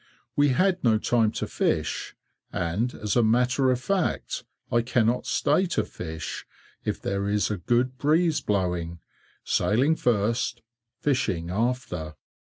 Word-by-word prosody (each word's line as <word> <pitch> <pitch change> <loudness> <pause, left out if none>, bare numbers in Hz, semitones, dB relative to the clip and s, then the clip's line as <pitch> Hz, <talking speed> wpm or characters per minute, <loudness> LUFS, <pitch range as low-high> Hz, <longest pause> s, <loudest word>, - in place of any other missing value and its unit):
We 145 0 +4
had 185 +7 +2
no 115 -3 +4
time 110 0 +2
to - - -2
fish, - - -1 0.4
and 100 +9 -1
as 105 -2 -2
a 120 - +5
matter 125 +4 +3
of 125 -1 +2
fact 190 +3 -1 0.3
I 120 - +3
cannot 120 0 +1
stay 165 +6 +2
to - - +3
fish, 80 -2 -6 0.4
if - - -2
there 100 +1 -2
is 105 +1 +1
a 105 - -1
good 120 +7 0
breeze 160 +2 +2
blowing; 90 -4 -1 0.5
sailing 130 +9 +2
first, 115 -1 0 0.3
fishing 90 - 0
after! 95 -8 -2
120 Hz, 135 wpm, -26 LUFS, 100-130 Hz, 0.5 s, a